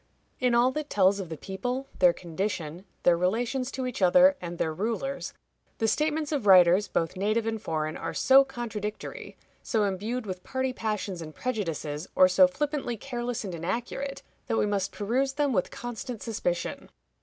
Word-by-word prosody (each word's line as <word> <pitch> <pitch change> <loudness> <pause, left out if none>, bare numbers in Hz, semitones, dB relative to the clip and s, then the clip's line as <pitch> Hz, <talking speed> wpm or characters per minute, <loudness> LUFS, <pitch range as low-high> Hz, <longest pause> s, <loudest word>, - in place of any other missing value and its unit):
In 250 -2 +2
all 245 +2 +4
that 300 +1 -4
tells 195 0 +3
of 185 -4 -5
the 160 - -5
people, 245 - -4
their 180 -2 +7
condition, 175 0 -4 0.2
their 175 - +5
relations 235 +9 0
to 260 -1 -3
each 250 -4 -4
other, 270 +10 +6
and 175 -1 -5
their 160 -1 -1
rulers, 230 - -3 0.5
the 225 - +1
statements 305 +4 0
of 275 -9 -1
writers, 185 +1 +7
both 165 +2 -1
native 215 +4 0
and 225 -1 -2
foreign, 155 0 -2
are - - -4
so 270 +1 +6
contradictory, 225 -5 -6 0.2
so 220 -3 0
imbued 210 +5 -2
with 185 -2 -6
party 260 -1 -2
passions 210 -6 -3
and 155 -1 -8
prejudices, 165 - -3
or 185 - +7
so 185 0 +6
flippantly 280 +3 -2
careless 240 0 -4
and 190 -3 -5
inaccurate, 235 - -4 0.2
that 225 - 0
we - - +3
must 200 -2 -1
peruse 255 +6 0
them 290 -1 +1
with 185 -4 +1
constant 240 -1 -6
suspicion. 180 -6 -3
215 Hz, 170 wpm, -28 LUFS, 185-255 Hz, 0.5 s, their